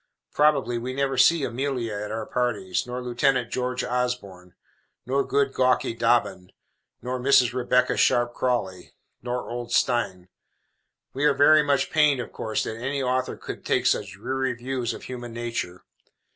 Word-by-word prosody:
Probably 140 Hz, -5 st, +2 dB
we 125 Hz, +2 st, -5 dB
never 135 Hz, -1 st, 0 dB
see 145 Hz, +4 st, +4 dB
Amelia 125 Hz, -2 st, -2 dB
at 105 Hz, 0 st, -4 dB
our 110 Hz, 0 st, -4 dB
parties, 105 Hz, -6 st, -1 dB
nor 125 Hz, +1 st, -5 dB
Lieutenant 125 Hz, 0 st, +1 dB
George 125 Hz, 0 st, -2 dB
Osborne, 100 Hz, -8 st, -3 dB, 0.5 s
nor 135 Hz, +2 st, +1 dB
good 140 Hz, -1 st, 0 dB
gawky 130 Hz, -2 st, +2 dB
Dobbin, 115 Hz, -6 st, 0 dB, 0.5 s
nor 125 Hz, +1 st, -3 dB
Mrs. 125 Hz, -2 st, +4 dB
Rebecca 125 Hz, 0 st, +2 dB
Sharp 120 Hz, 0 st, +2 dB
Crawley, 100 Hz, -9 st, -2 dB, 0.3 s
nor 125 Hz, +1 st, -4 dB
old 120 Hz, 0 st, -6 dB
Steyne. 95 Hz, -9 st, 0 dB, 0.8 s
We 140 Hz, +3 st, -1 dB
are 145 Hz, -2 st, +4 dB
very 155 Hz, +2 st, +6 dB
much 140 Hz, -2 st, 0 dB
pained, 150 Hz, -3 st, +3 dB
of 120 Hz, -, -6 dB
course, 110 Hz, -1 st, -2 dB
that 110 Hz, -, -5 dB
any 135 Hz, +3 st, -2 dB
author 130 Hz, 0 st, -1 dB
should -, -, -6 dB
take -, -, 0 dB
such -, -, +1 dB
dreary 135 Hz, -1 st, -2 dB
views 125 Hz, -1 st, -3 dB
of -, -, -11 dB
human 120 Hz, -2 st, -7 dB
nature. 115 Hz, -7 st, -4 dB
125 Hz, 155 wpm, -25 LUFS, 115-130 Hz, 0.8 s, very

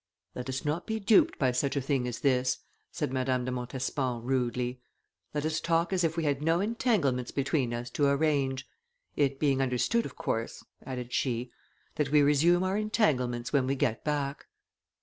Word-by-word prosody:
"Let 125 Hz, +1 st, -6 dB
us 130 Hz, +2 st, -3 dB
not 155 Hz, +4 st, -1 dB
be 220 Hz, 0 st, -1 dB
duped 240 Hz, -, +4 dB
by 130 Hz, -3 st, +2 dB
such 135 Hz, +3 st, 0 dB
a -, -, +2 dB
thing 135 Hz, -2 st, 0 dB
as 120 Hz, -, -5 dB
this," 130 Hz, -2 st, +2 dB, 0.3 s
said 130 Hz, -, -3 dB
Madame 130 Hz, -1 st, 0 dB
de 130 Hz, -, -2 dB
Montespan, 125 Hz, 0 st, -2 dB
rudely; 125 Hz, -1 st, -1 dB, 0.5 s
"let 150 Hz, 0 st, -2 dB
us 160 Hz, +1 st, 0 dB
talk 165 Hz, +2 st, +1 dB
as 180 Hz, -2 st, +1 dB
if 165 Hz, 0 st, 0 dB
we 165 Hz, -, 0 dB
had 145 Hz, -2 st, 0 dB
no 165 Hz, +2 st, +2 dB
entanglements 195 Hz, -, +1 dB
between 140 Hz, -2 st, 0 dB
us 120 Hz, +1 st, -4 dB
to 145 Hz, +2 st, +2 dB
arrange; 140 Hz, -2 st, +1 dB, 0.5 s
it 140 Hz, -2 st, +1 dB
being 140 Hz, -3 st, +2 dB
understood, 135 Hz, -, +1 dB
of -, -, -13 dB
course," 115 Hz, 0 st, -3 dB, 0.2 s
added 125 Hz, -2 st, -6 dB
she, 125 Hz, -1 st, -1 dB, 0.5 s
"that 150 Hz, -2 st, +1 dB
we 150 Hz, 0 st, +5 dB
resume 160 Hz, +5 st, +4 dB
our 190 Hz, +2 st, 0 dB
entanglements 130 Hz, -, 0 dB
when 135 Hz, -3 st, +3 dB
we 135 Hz, -, +1 dB
get 125 Hz, -5 st, 0 dB
back." 145 Hz, -2 st, -2 dB
135 Hz, 180 wpm, -29 LUFS, 125-155 Hz, 0.5 s, we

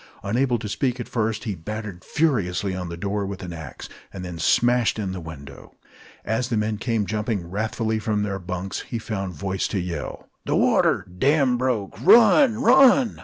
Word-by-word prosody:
Unable 120 Hz, +5 st, +1 dB
to 110 Hz, -, -6 dB
speak 125 Hz, +3 st, -1 dB
at 120 Hz, -, -5 dB
first, 110 Hz, -2 st, -1 dB
he 110 Hz, -4 st, -2 dB
battered 105 Hz, +1 st, -7 dB
furiously 105 Hz, -, 0 dB
on 90 Hz, -2 st, -5 dB
the 85 Hz, -, -6 dB
door 100 Hz, +3 st, -2 dB
with 95 Hz, -1 st, -6 dB
an 90 Hz, -2 st, -6 dB
axe, 80 Hz, -4 st, -8 dB, 0.2 s
and 90 Hz, -1 st, -7 dB
then 85 Hz, -2 st, -7 dB
smashed 120 Hz, +9 st, +2 dB
in 100 Hz, -3 st, -3 dB
the 95 Hz, -, -5 dB
window. 70 Hz, -4 st, -11 dB, 0.5 s
As 120 Hz, +3 st, -1 dB
the 115 Hz, -, 0 dB
men 105 Hz, 0 st, -1 dB
came 115 Hz, -4 st, 0 dB
jumping 105 Hz, -3 st, -2 dB
wrathfully 110 Hz, +3 st, -2 dB
from 105 Hz, -1 st, -1 dB
their 100 Hz, -1 st, -3 dB
bunks, 90 Hz, +1 st, -4 dB
he 115 Hz, -, -5 dB
found 100 Hz, -5 st, -4 dB
voice 95 Hz, +5 st, -2 dB
to 100 Hz, -, -2 dB
yell: 85 Hz, -4 st, -5 dB, 0.2 s
"The -, -, 0 dB
water! -, -, +3 dB
Dam 140 Hz, -3 st, +3 dB
broke! 120 Hz, -4 st, -2 dB
Run! 235 Hz, -, +6 dB
Run!" 260 Hz, -1 st, +5 dB
105 Hz, 180 wpm, -23 LUFS, 95-120 Hz, 0.5 s, Run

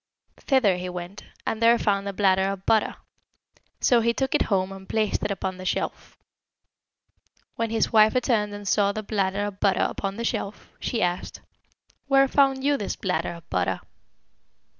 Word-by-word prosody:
Thither 235 Hz, -10 st, +2 dB
he 180 Hz, 0 st, -4 dB
went, 180 Hz, +2 st, -7 dB, 0.2 s
and 225 Hz, -, -2 dB
there 230 Hz, +1 st, +6 dB
found 200 Hz, -3 st, 0 dB
a -, -, -1 dB
bladder 190 Hz, -1 st, +3 dB
of 195 Hz, -1 st, -5 dB
butter; 220 Hz, -2 st, +2 dB, 0.8 s
so 245 Hz, -, +4 dB
he 235 Hz, +1 st, +1 dB
took 265 Hz, -1 st, -1 dB
it -, -, +2 dB
home 190 Hz, -2 st, +1 dB
and 190 Hz, 0 st, -11 dB
placed 215 Hz, -2 st, 0 dB
it -, -, 0 dB
upon 190 Hz, -2 st, -3 dB
the 185 Hz, -, -8 dB
shelf. 185 Hz, -, -3 dB, 1.4 s
When 230 Hz, 0 st, -1 dB
his 225 Hz, +1 st, 0 dB
wife 215 Hz, +1 st, +6 dB
returned 230 Hz, -5 st, +1 dB
and 205 Hz, -1 st, -8 dB
saw 200 Hz, 0 st, +3 dB
the 215 Hz, -, -4 dB
bladder 200 Hz, -1 st, -1 dB
of 200 Hz, -1 st, -6 dB
butter 195 Hz, -2 st, +2 dB
upon 195 Hz, -1 st, -4 dB
the 235 Hz, -, -3 dB
shelf, 205 Hz, -2 st, -4 dB
she 230 Hz, -5 st, -1 dB
asked, 175 Hz, 0 st, -3 dB, 0.7 s
'Where 275 Hz, 0 st, +5 dB
found 270 Hz, -1 st, +2 dB
you 285 Hz, 0 st, +2 dB
this 205 Hz, -, -3 dB
bladder 175 Hz, -3 st, -2 dB
of 170 Hz, -1 st, -13 dB
butter?' 90 Hz, -1 st, 0 dB
205 Hz, 175 wpm, -25 LUFS, 190-230 Hz, 1.4 s, there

